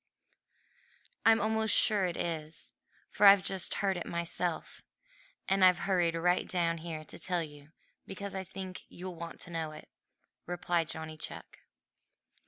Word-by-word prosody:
"I'm 225 0 +6
almost 220 +1 +4
sure 205 -3 +5
it 175 -2 -3
is, 160 -2 -3 0.4
for 205 - +5
I've 195 -1 +8
just 190 -2 +1
heard 190 -2 +1
it 175 - -5
myself, 170 0 -3 0.7
and 195 0 +2
I've 180 -1 +7
hurried 175 -4 +2
right 180 +2 +1
down 170 -2 0
here 160 -2 -6
to - - -10
tell 180 -2 0
you 145 -1 -12 0.4
because 200 +1 -6
I 190 0 -3
think 190 0 -8
you'll 180 +1 -7
want 170 0 -8
to 175 - -8
know 160 -2 -3
it," - - -12 0.6
replied 175 -1 -1
Johnny 160 0 -6
Chuck. - - -9
175 Hz, 150 wpm, -31 LUFS, 165-190 Hz, 0.7 s, I've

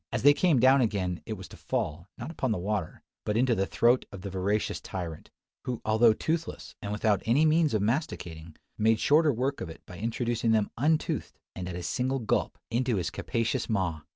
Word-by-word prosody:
As - - -2
they 145 +1 +8
came 160 -3 +3
down 130 +2 +6
again, 95 -6 -1
it - - -2
was - - -8
to - - -12
fall, 80 +3 -3
not 160 - -6
upon 130 -6 -1
the 110 - 0
water, 95 -2 -3 0.2
but 105 +1 -1
into 125 0 +3
the 95 -2 0
throat 120 +2 +3
of 100 - -8
the 100 0 -6
voracious 100 +3 -1
tyrant; 85 -4 -6 0.4
who, 125 -2 -2
although 110 +1 +5
toothless 160 +9 -3
and 100 - -4
without 105 -1 +1
any 135 +8 +4
means 155 -4 +3
of 105 - +1
masticating, 85 - -3 0.2
made 110 +1 +3
shorter 150 +4 +4
work 135 +3 -1
of 95 - -4
it 80 - -12
by 90 - -10
introducing 115 +1 0
them 110 -2 +1
untoothed, 155 +5 0 0.2
and 90 -1 -5
at 90 - -5
a 90 - -5
single 130 +6 0
gulp, 115 -5 -1
into 120 0 +1
his 90 -4 -1
capacious 115 +3 -1
maw! 95 -7 0
110 Hz, 205 wpm, -28 LUFS, 95-130 Hz, 0.4 s, they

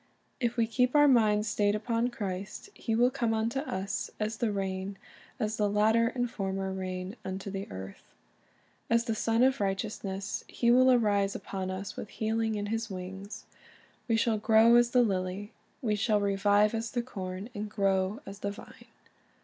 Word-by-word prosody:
"' - - -41
If 240 -1 -1
we 230 - +3
keep 250 +4 +1
our 295 0 +7
minds 215 -5 +4
stayed 210 0 +2
upon 230 +2 0
Christ, 205 - -5
He 225 - -2
will 245 +2 +4
come 235 -4 0
unto 230 +4 0
us 195 -7 -3
"as 215 +1 -2
the 230 -2 0
rain, 195 0 -3 0.4
as 215 -2 -1
the 210 -1 +2
latter 220 +3 +3
and 245 +1 -1
former 195 -3 -3
rain 185 +1 -4
unto 190 +1 -5
the 195 0 -5
earth." 95 +1 -8 0.9
As 230 0 +3
the 230 - 0
Sun 225 +2 +2
of 265 -1 +3
Righteousness, 195 0 -3
He 235 -1 +1
will 255 +1 +6
arise 205 -5 +2
upon 190 -1 -4
us 190 +1 -5
"with 210 - -7
healing 220 0 -1
in 205 -1 -2
His 225 0 -2
wings." 190 +2 -7 0.6
We 230 - +2
shall 225 -1 +1
"grow 220 +2 +6
as 240 0 +5
the 250 0 +4
lily." 195 0 -2 0.3
We 215 -3 +1
shall 210 0 +2
"revive 205 +1 +3
as 225 0 -2
the 240 -2 -2
corn, 190 -3 -6
and 210 -1 -4
grow 195 0 0
as 195 +1 -9
the 200 - -2
vine." 200 - -11
210 Hz, 180 wpm, -30 LUFS, 195-230 Hz, 0.9 s, our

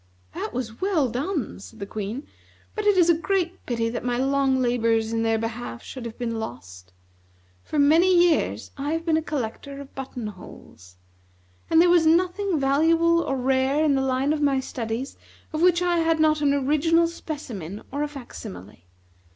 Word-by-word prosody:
"That - - -4
was 230 -3 -5
well 355 -9 +1
done," 265 - -3
said 95 -1 -12
the 200 - -5
Queen; 215 +7 -5 0.5
"but 425 -1 -2
it 410 -2 +4
is 350 -2 +5
a 340 - +6
great 360 +1 -1
pity 230 -2 0
that 235 +1 -4
my 245 -1 -1
long 270 0 +2
labors 230 -2 +1
in 225 - 0
their 225 0 +2
behalf 225 - -5
should 255 -3 -8
have 230 -1 -7
been 230 -2 -3
lost. 90 - -8 0.7
For - - -4
many 320 +6 +5 0.2
years - - -1
I 290 +3 -1
have 330 0 -3
been 325 -2 +2
a 320 - +2
collector 280 -1 -5
of 280 -1 -11
button 260 -3 -6
holes; 90 - -11 0.7
and 325 - +5
there 350 - +6
was 340 -2 +5
nothing 360 +1 +2
valuable 330 +5 +3
or 270 -4 -2
rare 265 +3 +1
in 295 - +3
the 270 - +1
line 265 +2 +1
of 305 - -2
my 280 -2 +2
studies 240 0 -4 0.4
of 310 - -2
which 355 0 +4
I 350 -1 +2
had 325 -1 +2
not 310 -1 +3
an 285 -1 +3
original 305 +5 +3
specimen 240 - -6
or 285 +2 -3
a 295 - 0
facsimile. 205 - -10
275 Hz, 185 wpm, -24 LUFS, 230-325 Hz, 0.7 s, a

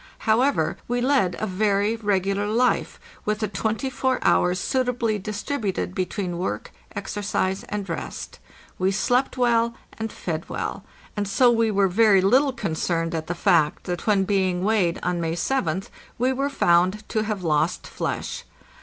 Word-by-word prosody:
However, 250 +5 +2
we 245 0 0
led 245 -9 +2
a - - -2
very 205 +2 +1
regular 200 -2 0
life, 240 +4 +1 0.2
with 210 0 0
the 215 -1 -1
twenty 220 +6 -2
four 260 0 0
hours 180 +1 +3
suitably 245 -3 0
distributed 205 -1 -3
between 185 -1 -3
work, 185 - -3 0.2
exercise, 200 -1 -2
and 205 -1 -4
rest. 165 - -6 0.4
We 185 +1 +2
slept 245 +8 +1
well 235 -1 +2 0.2
and 225 -1 -3
fed 165 -2 -4
well, - - -4 0.3
and 205 -1 -1
so 240 +5 +4
we 230 -1 +2
were 200 -2 +3
very 200 0 +5
little 260 +9 +4
concerned 165 -6 -2
at 160 -1 -3
the 175 - -2
fact 170 -4 +2
that 175 +4 -4
when 200 -2 +4
being 185 -2 +1
weighed 195 -5 +2
on 175 -1 0
May 165 -1 -1
7th 180 -2 -1 0.3
we 255 +2 +2
were 275 +2 -1
found 185 -4 +2
to 215 - 0
have 210 -3 -3
lost 160 +2 +1
flesh. - - -4
205 Hz, 155 wpm, -24 LUFS, 180-230 Hz, 0.4 s, very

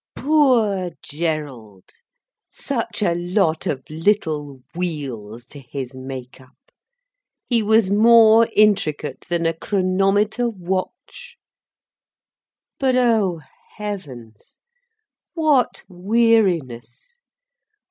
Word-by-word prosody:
Poor 240 - +2
Gerald, 145 - -5 0.7
such 235 -5 -4
a 175 -4 +2
lot 175 -1 -1
of 130 -2 -4
little 155 -6 -2
wheels 130 -10 -5
to 140 +3 -12
his 130 0 -7
make 130 -1 -9
up! 130 0 -22 0.9
He 235 -3 +1
was 220 -2 +2
more 225 +1 +6
intricate 155 -9 +1
than 170 -1 -1
a 165 - +1
chronometer 195 +6 0
watch. 185 -3 -6 1.4
But 260 -2 +1
oh 220 -9 +1 0.4
heavens, 135 - -8 0.8
what 300 -7 +1
weariness! 185 - 0
180 Hz, 85 wpm, -20 LUFS, 140-220 Hz, 1.4 s, more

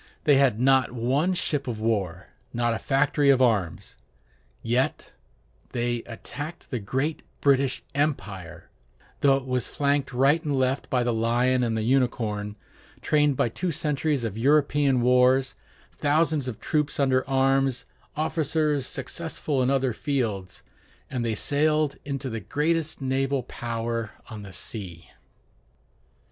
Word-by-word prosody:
They 145 -2 +5
had 130 -6 +3
not 130 -1 +4
one 135 +10 +1
ship 145 -5 -2
of 115 -3 -3
war, 105 -6 -1 0.2
not 120 0 +1
a 115 - -3
factory 145 0 +2
of 135 -2 +5
arms. 110 -9 0 0.7
Yet 120 +3 0 0.6
they 120 -1 -1
attacked 145 +8 -8
the 125 - -1
great 135 +9 -2 0.2
British 135 -2 +2
empire, 95 - -3 0.5
though 135 -1 +4
it 135 - -7
was 125 -2 -1
flanked 140 -1 0
right 135 +6 +3
and 145 -3 -1
left 130 +1 0
by 125 -2 +2
the 120 -1 0
lion 120 +3 +2
and 115 -2 0
the 110 - -1
unicorn, 110 -5 0 0.5
trained 150 -3 +2
by - - +2
two 180 +9 -2
centuries 150 -2 -1
of 110 -1 -3
European 140 -1 +3
wars, 125 +2 +4 0.4
thousands 150 -1 +1
of 120 -5 -5
troops 150 -2 -1
under 130 -2 +3
arms, 135 -1 +2 0.3
officers 155 -3 0
successful 145 0 -3
in 125 - +2
other 135 -2 +1
fields, 110 -9 -3 0.5
and 125 -3 -2
they 115 -2 -1
sailed 150 +3 +1
into 140 -1 -4
the 115 -3 -3
greatest 155 - -1
naval 135 0 0
power 115 -2 -4 0.2
on 110 -2 -7
the 100 -1 -10
sea. 90 -5 -7
130 Hz, 135 wpm, -26 LUFS, 115-145 Hz, 0.7 s, They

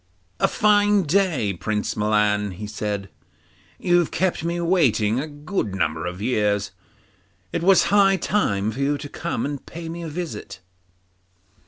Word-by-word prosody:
'A - - +4
fine 205 -1 +3
day, 155 - +1
Prince 105 +4 -2
Milan,' 105 -1 +1
he 105 +4 -7
said; 105 -1 -4 0.7
'you've 175 -2 +2
kept 185 -3 -1
me 170 +1 -1
waiting 130 - +2
a 150 - -3
good 145 - -3
number 80 -2 -1
of 90 +1 -6
years; 105 -4 0 0.8
it - - -1
was 190 +2 +5
high 195 -1 +5
time 110 - 0
for 130 - -8
you 140 +1 +1
to 145 - -7
come 170 +3 -3
and 145 -1 -4
pay 165 0 -7
me 170 +1 -6
a 165 - -5
visit. 160 - -6
145 Hz, 150 wpm, -23 LUFS, 105-175 Hz, 0.8 s, was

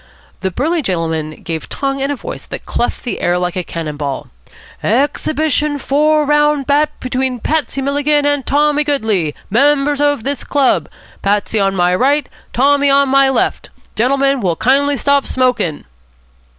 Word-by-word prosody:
The 190 - -1
burly 315 - -1
gentleman 165 - -3
gave 160 -2 -5
tongue 275 0 -2
in 275 +1 -1
a 285 - -1
voice - - -8
that - - -7
cleft 240 - -2
the 245 - -4
air 175 0 +1
like 180 -1 -2
a 185 - -2
cannon 160 -3 -5
ball. 140 -2 -4 0.5
"Ex 265 +7 0
hib 310 - -2
it 310 -2 +2
i - - 0
on 290 -1 -3
four 300 +2 +2
round 295 -1 +2
bout 290 +2 +2
between 255 0 -2
Patsy 290 0 -1
Milligan 290 +1 +1
and 290 -1 +1
Tommy 295 +2 +2
Goodley, 220 - 0 0.2
members 285 +4 +2
of 290 -5 +1
this 280 0 -3
club. 280 -3 +1 0.3
Patsy 205 +2 0
on 195 -1 +1
my 180 -1 +2
right, 275 +7 +2 0.2
Tommy 285 +2 +3
on 275 0 +3
my 275 0 +4
left. 265 - -1 0.3
Gentlemen 275 +3 +2
will 180 -7 0
kindly 280 - +2
stop 280 +1 +2
smokin'." 250 - 0
275 Hz, 170 wpm, -16 LUFS, 205-290 Hz, 0.5 s, my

